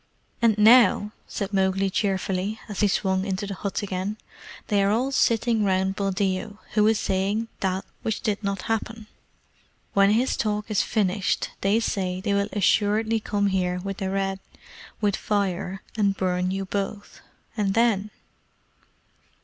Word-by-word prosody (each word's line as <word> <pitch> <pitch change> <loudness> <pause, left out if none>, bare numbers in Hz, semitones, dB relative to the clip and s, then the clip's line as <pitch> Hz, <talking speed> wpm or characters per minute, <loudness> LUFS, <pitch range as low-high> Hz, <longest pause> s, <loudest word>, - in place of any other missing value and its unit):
"And 225 -2 +4
now," 220 -1 +6 0.2
said 200 -1 -4
Mowgli 190 0 +1
cheerfully, 195 +1 -1
as 205 -3 -6
he 210 - +4
swung 190 -1 +1
into 195 +1 -2
the 200 - -4
hut 200 +3 -3
again, 195 +2 -3 0.5
"they 205 -1 +2
are 195 - +3
all 245 +6 +1
sitting 230 -3 +2
round 190 0 +1
Buldeo, 195 +1 -1 0.2
who 210 0 +4
is 220 -1 +3
saying 200 +4 -1
that 190 0 -1 0.2
which 220 - -2
did 210 0 -1
not 200 -2 -2
happen. 225 0 -3 0.9
When 200 0 +5
his 235 +5 +2
talk 210 0 -2
is 210 - +3
finished, 200 -3 0
they 200 +3 +3
say 185 -5 -2
they 200 +1 -1
will 200 +1 +1
assuredly 215 +2 +2
come 205 -1 -1
here 185 -2 0
with 195 +1 -5
the 190 - -2
Red 195 0 -1 0.6
with 205 -2 +2
fire 195 -2 -2
and 200 -3 +1
burn 180 -1 0
you 195 +1 -2
both. 200 +1 -4 0.3
And 205 -3 0
then?" 220 -3 +2
200 Hz, 150 wpm, -25 LUFS, 190-215 Hz, 0.9 s, now